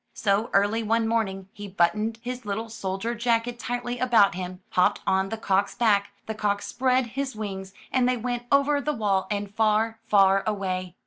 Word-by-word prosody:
So 205 +2 +1
early 205 +3 +2
one 225 +1 +1
morning 195 -4 -1
he 205 0 -8
buttoned 210 +4 +1
his 250 +1 -5
little 220 +2 -4
soldier 195 +1 -3
jacket 235 0 0
tightly 245 0 -3
about 230 -5 +4
him, 180 0 -6
hopped 180 - +3
on 190 0 +1
the 225 - -4
cock's 200 -2 0
back, 205 -4 +2 0.2
the 220 - -4
cock 205 -1 -1
spread 255 0 +1
his 270 -2 -3
wings, 195 -3 -5 0.2
and 250 -1 +2
they 255 - +1
went 240 +1 -3
over 285 +1 +3
the 300 +1 -1
wall 200 -6 0
and 205 -1 -3
far, 220 +1 +1
far 195 -1 +5
away. 185 -3 -2
215 Hz, 180 wpm, -25 LUFS, 195-240 Hz, 0.2 s, far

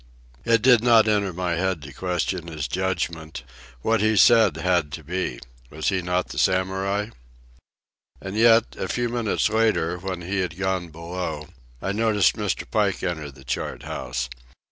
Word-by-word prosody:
It 115 -1 +3
did 125 -3 +6
not 115 -2 +6
enter 105 -3 +1
my 90 0 -2
head 95 -4 -1
to 70 +2 -10
question 90 -1 -2
his 75 -4 -4
judgment. 85 -6 -3 0.4
What 115 -2 +2
he 110 0 +2
said 110 -9 +6
had 85 -3 +1
to 80 - -6
be. 90 +5 -3 0.3
Was 75 +1 -2
he 95 -2 0
not 90 +1 -1
the - - -4
Samurai? 95 +2 0 1.1
And 95 +1 -7
yet, 115 +1 +4
a 95 - -2
few 120 +5 -1
minutes 115 -3 0
later, 110 -6 +1
when 90 -1 -5
he 95 +3 -2
had 90 -3 -2
gone 95 -2 -1
below, 85 -1 -5 0.3
I 95 - -1
noticed 105 -2 +2
Mr. - - -2
Pike - - 0
enter 80 -5 -3
the 65 -1 -15
chart 65 - -4
house. 60 0 -4
95 Hz, 165 wpm, -24 LUFS, 85-105 Hz, 1.1 s, did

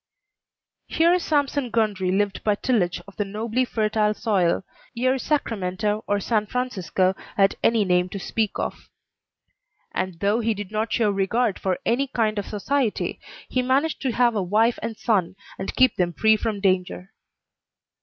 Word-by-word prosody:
Here 340 +2 +3
Sampson 285 -5 0
Gundry 210 -5 0
lived 200 +1 0
by 210 -1 +2
tillage 200 -7 0
of 200 - -14
the 205 - +1
nobly 220 +5 -1
fertile 215 -2 0
soil 190 -7 +1 0.3
ere 255 +2 +2
Sacramento 210 -7 -1
or 205 0 +1
San 215 +1 0
Francisco 195 -6 0 0.2
had 195 -1 +4
any 225 -3 +3
name 180 0 +2
to 200 - -6
speak 215 +2 -2
of. - - -5 1.0
And 185 -3 -3
though 205 +4 +2
he 225 -1 0
did 205 -1 -7
not 220 +1 -2
show 220 -4 +2
regard 200 +2 0
for 185 -2 -1
any 265 +4 +1
kind 220 -5 0
of 200 - -5
society, 235 +3 -1 0.3
he 255 - 0
managed 270 +5 +1
to 265 - 0
have 240 0 +3
a 205 - +1
wife 215 +6 +2
and 225 -1 -4
son, 190 -6 0 0.2
and 190 - -4
keep 255 0 +4
them 175 -1 +1
free 220 +6 +4
from 215 -1 -3
danger. 185 +1 0
215 Hz, 160 wpm, -24 LUFS, 195-240 Hz, 1.0 s, had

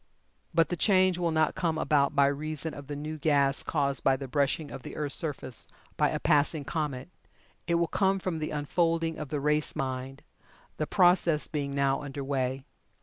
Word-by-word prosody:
But 165 -1 +3
the 175 - -1
change 185 -1 +3
will 170 -1 +1
not 155 -1 +2
come 165 -3 -1
about 145 -2 +2
by 140 -1 +5
reason 155 +2 -2
of 140 -1 -9
the 145 - -5
new 155 +2 -5
gas 140 -2 +2
caused 140 -3 -1
by 135 - +4
the 135 0 -6
brushing 145 +2 0
of - - -7
the - - -9
earth's 150 -2 -1
surface 140 -6 -2 0.3
by - - +2
a - - -2
passing 150 -1 +2
comet. 150 -3 -3 0.6
It 170 - +2
will 170 0 +3
come 195 +2 +1
from 180 -4 -3
the 155 - -3
unfolding 165 +2 0
of 150 -3 -5
the 150 - -2
race 150 +1 +1
mind, 130 0 -4 0.5
the 155 - -2
process 175 -4 +3
being 140 -3 -3
now 140 -1 +1
under 140 -1 -6
way. 135 -1 -2
150 Hz, 190 wpm, -28 LUFS, 140-165 Hz, 0.6 s, by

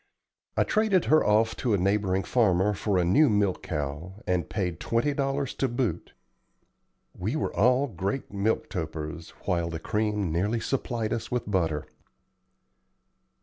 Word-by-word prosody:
I - - +5
traded 215 -4 +2
her 155 - +5
off 110 +1 +3
to 120 -5 +1
a - - +2
neighboring 95 0 +1
farmer 105 -4 +2
for 100 -1 0
a 90 - +2
new 140 - +5
milch 100 -3 +1
cow, 75 +4 -4
and 90 -4 0
paid 90 -5 -2
twenty 120 +6 0
dollars 140 -1 -1
to 135 - 0
boot. 120 -9 -2 1.0
We 105 +10 -2
were 155 - -2
all 125 +5 +4
great 100 - -4
milk 100 +3 0
topers, 80 -2 -5 0.2
while 85 -2 0
the 85 - -4
cream 105 -1 -1
nearly 100 +8 0
supplied 115 -3 -2
us 115 +1 -4
with 125 -2 -1
butter. 80 -7 0
105 Hz, 145 wpm, -27 LUFS, 90-120 Hz, 1.0 s, I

